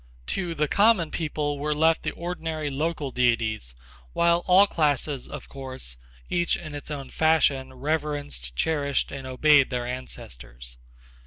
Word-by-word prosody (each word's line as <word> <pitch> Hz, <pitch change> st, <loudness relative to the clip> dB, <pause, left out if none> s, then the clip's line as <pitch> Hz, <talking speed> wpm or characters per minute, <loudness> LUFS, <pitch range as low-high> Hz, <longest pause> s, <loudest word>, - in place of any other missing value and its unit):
To 175 Hz, -3 st, -2 dB
the 150 Hz, -1 st, +1 dB
common 200 Hz, -3 st, +4 dB
people 150 Hz, -3 st, -2 dB
were 150 Hz, +1 st, 0 dB
left 160 Hz, +2 st, +3 dB
the -, -, -2 dB
ordinary 160 Hz, -4 st, -4 dB
local 150 Hz, 0 st, -2 dB
deities, 115 Hz, -, 0 dB, 0.4 s
while 170 Hz, 0 st, +3 dB
all 190 Hz, +2 st, +7 dB
classes, 145 Hz, -6 st, 0 dB
of -, -, -8 dB
course, 130 Hz, -, -6 dB, 0.3 s
each 175 Hz, 0 st, +1 dB
in 155 Hz, -3 st, -8 dB
its 145 Hz, 0 st, -7 dB
own 140 Hz, -3 st, -6 dB
fashion 145 Hz, -5 st, +2 dB
reverenced, 145 Hz, -, -3 dB
cherished 140 Hz, -, 0 dB
and 135 Hz, -1 st, -6 dB
obeyed 140 Hz, +2 st, +5 dB
their 125 Hz, -2 st, -2 dB
ancestors. 60 Hz, -, -8 dB
145 Hz, 140 wpm, -26 LUFS, 130-160 Hz, 0.4 s, all